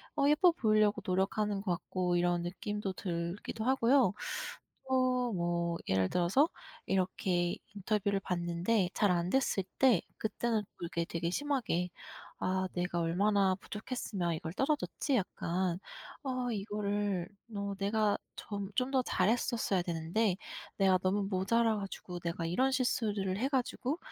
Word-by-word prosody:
어 280 Hz, -, +3 dB
예뻐 340 Hz, +4 st, +6 dB
보이려고 215 Hz, -8 st, +3 dB
노력하는 195 Hz, +2 st, 0 dB
것 190 Hz, -3 st, -1 dB
같고 180 Hz, +1 st, -1 dB
이런 175 Hz, 0 st, +2 dB
느낌도 195 Hz, +2 st, -3 dB
들기도 175 Hz, +5 st, -4 dB
하고요. 260 Hz, -4 st, +4 dB, 0.8 s
또 255 Hz, -1 st, +3 dB, 0.2 s
뭐 170 Hz, -1 st, 0 dB
예를 95 Hz, -1 st, +2 dB
들어서 185 Hz, -, +3 dB, 0.4 s
이렇게 180 Hz, -2 st, +1 dB, 0.2 s
인터뷰를 200 Hz, 0 st, 0 dB
봤는데 180 Hz, +3 st, 0 dB
잘 205 Hz, -, +3 dB
안됐을 185 Hz, +4 st, +1 dB, 0.2 s
때 260 Hz, -3 st, +5 dB, 0.2 s
그때는 220 Hz, 0 st, 0 dB, 0.2 s
또 170 Hz, -, -5 dB
이렇게 170 Hz, 0 st, -2 dB
되게 170 Hz, 0 st, -2 dB
심하게 240 Hz, -10 st, 0 dB, 0.5 s
'아 185 Hz, 0 st, 0 dB
내가 175 Hz, -1 st, -1 dB
얼마나 190 Hz, +3 st, +3 dB
부족했으면 205 Hz, -4 st, -3 dB
이걸 160 Hz, +1 st, -5 dB
떨어졌지?' 285 Hz, 0 st, 0 dB
약간 180 Hz, -2 st, -1 dB, 0.4 s
'아 255 Hz, -2 st, -1 dB
이거를 205 Hz, -3 st, -1 dB, 0.3 s
어 200 Hz, 0 st, -2 dB
내가 210 Hz, +1 st, +2 dB, 0.2 s
점 200 Hz, -2 st, -5 dB
좀 255 Hz, +1 st, +1 dB
더 260 Hz, -1 st, +3 dB
잘했었어야 220 Hz, -1 st, +1 dB
되는데 175 Hz, +4 st, 0 dB, 0.4 s
내가 190 Hz, -2 st, +5 dB
너무 195 Hz, +2 st, +1 dB
모자라 220 Hz, +4 st, +2 dB
가지고 190 Hz, -3 st, -6 dB
내가 170 Hz, 0 st, -3 dB
이런 255 Hz, +11 st, +2 dB
실수를 210 Hz, -7 st, 0 dB
해 260 Hz, +5 st, +1 dB
가지고 265 Hz, +2 st, -1 dB
195 Hz, 290 characters per minute, -32 LUFS, 175-230 Hz, 0.8 s, 예뻐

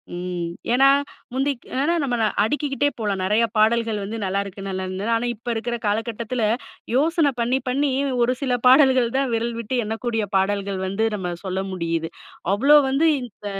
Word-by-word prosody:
ம். 175 Hz, -1 st, -4 dB, 0.2 s
ஏனா 270 Hz, +2 st, +5 dB, 0.5 s
முந்திக் 270 Hz, -1 st, -1 dB, 0.2 s
அ -, -, +2 dB
ந -, -, +4 dB
நம்ம 250 Hz, -3 st, 0 dB, 0.3 s
அடிக்கிக்கிட்டே 285 Hz, +3 st, 0 dB
போலாம் 200 Hz, -3 st, -1 dB
நெறைய 210 Hz, +4 st, +3 dB
பாடல்கள் 225 Hz, 0 st, +2 dB
வந்து, 215 Hz, +3 st, -5 dB
"நல்லாருக்கு! 195 Hz, 0 st, -3 dB
நல்லா 190 Hz, 0 st, -3 dB
இருந்தது!" 195 Hz, +5 st, -3 dB
ஆனா 235 Hz, +2 st, -1 dB
இப்ப 235 Hz, +3 st, -21 dB
இருக்குற 235 Hz, +2 st, -2 dB
காலகட்டத்துல 225 Hz, +2 st, -2 dB, 0.5 s
யோசன 310 Hz, +1 st, +3 dB
பண்ணி 250 Hz, +3 st, +1 dB
பண்ணி 275 Hz, +2 st, +1 dB, 0.3 s
ஒரு 255 Hz, +2 st, +1 dB
சில 260 Hz, -3 st, 0 dB
பாடல்கள் 260 Hz, -2 st, +5 dB
தான் 270 Hz, -2 st, 0 dB
விரல் 235 Hz, +1 st, -2 dB
விட்டு 235 Hz, +3 st, -3 dB
எண்ணக்கூடிய 225 Hz, 0 st, -2 dB
பாடல்கள் 195 Hz, 0 st, -1 dB
வந்து 195 Hz, +4 st, 0 dB
நம்ம 180 Hz, -3 st, -3 dB
சொல்ல 190 Hz, 0 st, -2 dB
முடியிது. 165 Hz, -2 st, -2 dB, 0.4 s
அவ்வளோ 275 Hz, +9 st, +6 dB
வந்து 290 Hz, +5 st, +3 dB, 0.2 s
இந்த 215 Hz, -3 st, -12 dB
230 Hz, 160 wpm, -22 LUFS, 200-260 Hz, 0.5 s, அவ்வளோ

